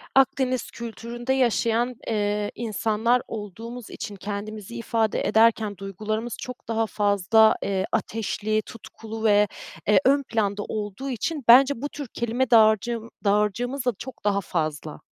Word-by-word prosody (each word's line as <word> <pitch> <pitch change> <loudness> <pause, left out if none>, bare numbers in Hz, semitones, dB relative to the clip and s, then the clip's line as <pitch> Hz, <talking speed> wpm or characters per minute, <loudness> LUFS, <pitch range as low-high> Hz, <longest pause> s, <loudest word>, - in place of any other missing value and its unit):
Akdeniz 260 -2 +2
kültüründe 235 +2 -4
yaşayan, 240 -1 +1
eee, 210 -1 0
insanlar 225 +2 +1
olduğumuz 225 +3 -7
için 210 -3 -7
kendimizi 210 +2 -6
ifade 225 -2 0
ederken 220 -2 +3
duygularımız 215 +4 -4
çok 250 -1 -8
daha 225 0 +1
fazla, 205 +2 +4
eee, 195 -1 0
ateşli, 215 0 -1
tutkulu 225 +1 -9
ve, 210 -1 +5 0.4
eee, 205 -2 +6
ön 280 +1 +4
planda 205 -4 -1
olduğu 210 +6 -5
için 270 +4 -3
bence 260 +1 +7
bu 290 - -3
tür 290 -2 -7
kelime 235 +2 -1
dağarcığım 225 +1 +4
dağarcığımız 210 +6 0
da 250 - +3
çok 260 - -9
daha 200 -1 +2
fazla. 155 -4 -3
220 Hz, 130 wpm, -25 LUFS, 205-240 Hz, 0.4 s, bence